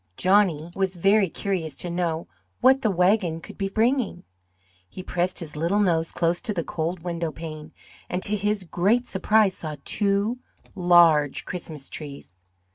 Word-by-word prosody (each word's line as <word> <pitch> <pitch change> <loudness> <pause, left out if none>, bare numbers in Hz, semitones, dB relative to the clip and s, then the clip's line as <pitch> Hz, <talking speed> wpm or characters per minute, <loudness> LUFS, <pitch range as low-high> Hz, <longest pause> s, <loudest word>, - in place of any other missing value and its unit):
Johnny 180 -4 +2
was 190 -1 0
very 195 +2 +3
curious 165 -6 -3
to - - -4
know 170 -2 -2 0.3
what 265 +1 +5
the 220 - +1
wagon 180 -2 +2
could - - -12
be 195 -1 -2
bringing. 225 -3 0 0.7
He 185 - -8
pressed 180 0 -1
his 155 -3 -3
little 170 +7 0
nose 165 -5 +1
close 170 +1 0
to 210 - -3
the 170 - -1
cold 165 +2 -4
window 170 -2 -3
pane, 155 -1 -8 0.4
and 180 +1 -2
to 210 - +2
his 205 0 -1
great 200 +8 +1
surprise, 205 0 +2
saw 155 -2 -5
two 205 +3 0 0.3
large 170 -6 +4
Christmas 160 -6 -6
trees. 145 - -8
180 Hz, 155 wpm, -24 LUFS, 165-200 Hz, 0.7 s, what